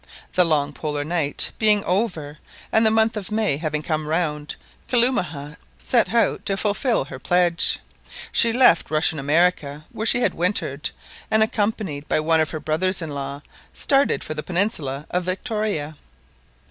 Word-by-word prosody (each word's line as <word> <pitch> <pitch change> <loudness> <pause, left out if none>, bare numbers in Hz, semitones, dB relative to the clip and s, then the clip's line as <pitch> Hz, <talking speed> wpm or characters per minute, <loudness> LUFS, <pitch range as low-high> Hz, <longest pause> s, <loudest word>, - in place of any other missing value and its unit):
The 180 - +4
long 150 -3 0
Polar 150 -1 -3
night 155 -2 0
being 210 -2 +3
over, 175 -7 -2 0.3
and 220 - +4
the 220 - +5
month 220 +1 +2
of 210 -1 -5
May 215 -9 +1
having 155 -1 -3
come 155 -1 -2
round, 150 -2 -2 0.3
Kalumah 180 - 0 0.3
set 235 -4 +2
out 235 0 +1
to 195 -1 0
fulfil 210 - 0
her 130 -2 -9
pledge. 175 +3 +2 0.5
She 230 - +4
left 240 -7 +4
Russian 155 0 +1
America, 150 0 +1
where 220 - -3
she 245 - +3
had - - +1
wintered, 170 -6 -1 0.4
and 220 0 +4
accompanied 205 -9 -2
by - - +2
one 160 +1 +3
of 155 - 0
her 155 - -5
brothers 180 +5 0
in 165 -3 -5
law, 140 0 -6 0.3
started 275 0 +2
for 155 - -4
the 150 - -4
peninsula 160 - -1
of 180 0 0
Victoria. 185 -5 -2
170 Hz, 160 wpm, -22 LUFS, 150-215 Hz, 0.5 s, the